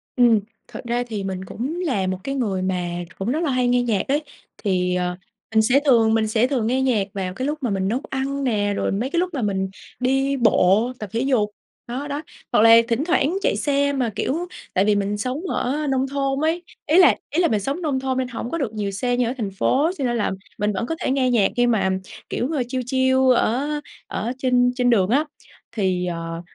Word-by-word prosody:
Ừm, 240 Hz, -4 st, +5 dB, 0.3 s
thật -, -, -8 dB
ra 240 Hz, +1 st, 0 dB
thì 210 Hz, -4 st, -4 dB
mình 190 Hz, -1 st, -4 dB
cũng 280 Hz, -, -4 dB
là 200 Hz, -, 0 dB
một 185 Hz, 0 st, -1 dB
cái 275 Hz, 0 st, -3 dB
người 205 Hz, -8 st, -1 dB
mà 175 Hz, -2 st, -2 dB, 0.2 s
cũng 210 Hz, +6 st, -1 dB
rất 310 Hz, -, 0 dB
là 315 Hz, -, 0 dB
hay 250 Hz, -1 st, +1 dB
nghe 245 Hz, 0 st, +3 dB
nhạc 215 Hz, -5 st, 0 dB
đấy. 290 Hz, +3 st, +1 dB, 0.3 s
Thì, 180 Hz, -3 st, 0 dB
ờ, 180 Hz, 0 st, -1 dB, 0.4 s
mình 220 Hz, -, +6 dB
sẽ 245 Hz, +5 st, +4 dB
thường 225 Hz, -4 st, +5 dB
mình 220 Hz, -1 st, +2 dB
sẽ 220 Hz, +3 st, +2 dB
thường 245 Hz, -6 st, 0 dB
nghe 260 Hz, +2 st, +1 dB
nhạc 225 Hz, -7 st, +1 dB
vào 185 Hz, -2 st, -3 dB
cái 260 Hz, +7 st, -3 dB
lúc 300 Hz, -, -1 dB
mà 240 Hz, -, +1 dB
mình 190 Hz, -1 st, 0 dB
nấu 245 Hz, +6 st, -1 dB
ăn 275 Hz, +1 st, -2 dB
nè, 205 Hz, -5 st, +1 dB
rồi -, -, -1 dB
mấy 225 Hz, +7 st, -1 dB
cái 340 Hz, +4 st, 0 dB
lúc 360 Hz, -1 st, -1 dB
mà 270 Hz, -, -2 dB
mình 190 Hz, -3 st, -1 dB, 0.3 s
đi 270 Hz, +2 st, +1 dB
bộ 225 Hz, -1 st, +3 dB
tập 210 Hz, -, -6 dB
thể 230 Hz, -, 0 dB
dục, 250 Hz, -6 st, +1 dB, 0.4 s
đó, 260 Hz, +5 st, -4 dB
đó. 290 Hz, +1 st, -3 dB, 0.3 s
Hoặc -, -, +4 dB
là 225 Hz, +1 st, +8 dB
thỉnh 240 Hz, +4 st, 0 dB
thoảng 340 Hz, 0 st, +1 dB
chạy -, -, +1 dB
xe 285 Hz, -1 st, +1 dB
mà, 255 Hz, -4 st, 0 dB
kiểu, 330 Hz, +10 st, -1 dB, 0.3 s
tại 190 Hz, +2 st, +3 dB
vì 210 Hz, -, +3 dB
mình 205 Hz, +1 st, -1 dB
sống 255 Hz, +7 st, -3 dB
ở 295 Hz, +2 st, -1 dB
nông 265 Hz, 0 st, +1 dB
thôn 275 Hz, 0 st, -1 dB
ấy, 325 Hz, +3 st, 0 dB, 0.2 s
ý 315 Hz, +4 st, +3 dB
là 360 Hz, -, +7 dB
ý 330 Hz, -, +1 dB
là 340 Hz, -, +4 dB
mình 215 Hz, -7 st, +1 dB
sống 275 Hz, -, -3 dB
nông 285 Hz, -5 st, 0 dB
thôn 260 Hz, -1 st, -2 dB
nên 260 Hz, -1 st, 0 dB
hổng 240 Hz, -1 st, -5 dB
có 335 Hz, -, -1 dB
được 255 Hz, -8 st, -2 dB
nhiều 205 Hz, -2 st, -2 dB
xe 245 Hz, +5 st, -1 dB
như 250 Hz, -, +2 dB
ở 245 Hz, -, -1 dB
thành 210 Hz, -5 st, -3 dB
phố, 280 Hz, -, +2 dB
cho -, -, -3 dB
nên 240 Hz, -1 st, 0 dB
là 210 Hz, -, 0 dB, 0.3 s
mình 210 Hz, 0 st, 0 dB
vẫn 215 Hz, -, -2 dB
có 325 Hz, -, -3 dB
thể -, -, -1 dB
nghe 265 Hz, -1 st, +2 dB
nhạc 210 Hz, -5 st, +3 dB
khi 245 Hz, 0 st, +4 dB
mà, 220 Hz, -5 st, +2 dB
ừm, 190 Hz, 0 st, 0 dB, 0.3 s
kiểu, 250 Hz, -, -2 dB
ờ, 270 Hz, -5 st, +1 dB
chill, 255 Hz, 0 st, -2 dB
chill 260 Hz, +1 st, +2 dB, 0.2 s
ở 255 Hz, +6 st, +1 dB, 0.4 s
ở 230 Hz, +4 st, -3 dB
trên 250 Hz, -1 st, +3 dB
trên 250 Hz, -1 st, +2 dB
đường 200 Hz, -5 st, +3 dB
á. 285 Hz, +6 st, +3 dB, 0.5 s
Thì, 185 Hz, -4 st, 0 dB
ờ, 165 Hz, -1 st, -4 dB
245 Hz, 240 wpm, -22 LUFS, 205-270 Hz, 0.5 s, là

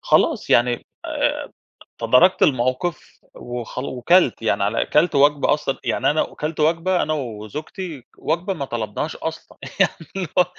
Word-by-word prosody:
خلاص -, -, +2 dB
يعني 120 Hz, 0 st, +3 dB, 0.2 s
آآ -, -, -1 dB, 0.5 s
تداركت 125 Hz, +11 st, +4 dB
الموقف 130 Hz, +5 st, 0 dB
وخل 120 Hz, +1 st, -6 dB
وكلْت 130 Hz, +1 st, +2 dB
يعني 110 Hz, -2 st, +1 dB
على 105 Hz, +3 st, 0 dB
كلْت 160 Hz, +4 st, +2 dB
وجْبة 145 Hz, +1 st, +4 dB
أصلًا، 150 Hz, -2 st, -3 dB
يعني -, -, +1 dB
أنا 150 Hz, -, +2 dB
وكلْت 155 Hz, +1 st, -5 dB
وجْبة 170 Hz, +4 st, +2 dB
أنا 155 Hz, -, -1 dB
وزوجتي 140 Hz, -, -6 dB
وجْبة 175 Hz, +5 st, -1 dB
ما 145 Hz, -6 st, -4 dB
طلبناهاش 120 Hz, -4 st, -4 dB
أصلًا. -, -, -7 dB, 0.2 s
يعني -, -, +4 dB, 0.2 s
اللي 185 Hz, -4 st, -2 dB
هو 180 Hz, -, +7 dB
145 Hz, 140 wpm, -21 LUFS, 120-165 Hz, 0.5 s, هو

